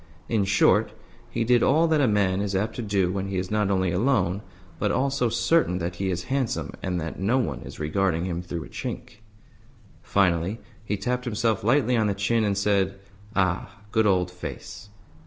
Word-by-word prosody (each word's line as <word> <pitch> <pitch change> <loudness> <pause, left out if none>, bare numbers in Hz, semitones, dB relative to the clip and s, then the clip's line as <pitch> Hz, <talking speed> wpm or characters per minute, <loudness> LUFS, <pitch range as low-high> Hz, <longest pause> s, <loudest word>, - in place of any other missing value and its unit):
In 110 -4 +1
short, 100 0 +3 0.4
he - - -1
did 120 +1 +4
all 160 +4 +4
that 155 -2 +3
a 135 - +4
man 100 -3 +2
is 100 -1 -2
apt 105 +4 -1
to - - -2
do 100 -4 +1
when 95 0 -2
he 95 -1 -3
is 90 +1 -3
not 105 -2 +1
only 95 -2 +1
alone, 100 -2 +1 0.4
but - - +1
also 135 -2 +1
certain 115 - +2
that 85 0 -4
he 95 0 -1
is 90 -1 -2
handsome 135 -1 -2
and 90 -1 -2
that 80 +1 -5
no 105 +7 +2
one 125 - -1
is - - -10
regarding 85 +2 0
him 85 -2 -3
through 85 -2 -5
a - - -11
chink. 125 -2 -6 0.8
Finally 95 +2 +1 0.2
he 105 -1 -2
tapped 125 +5 -2
himself 115 -3 0
lightly 125 +1 +3
on 110 -2 +2
the 100 - 0
chin, 110 +3 +1
and 100 -2 0
said, 100 -1 +1 0.4
"Ah, 95 +3 0
good 110 -1 +3
old 90 -2 +2
face!" 90 +3 -8
100 Hz, 195 wpm, -25 LUFS, 95-115 Hz, 0.8 s, did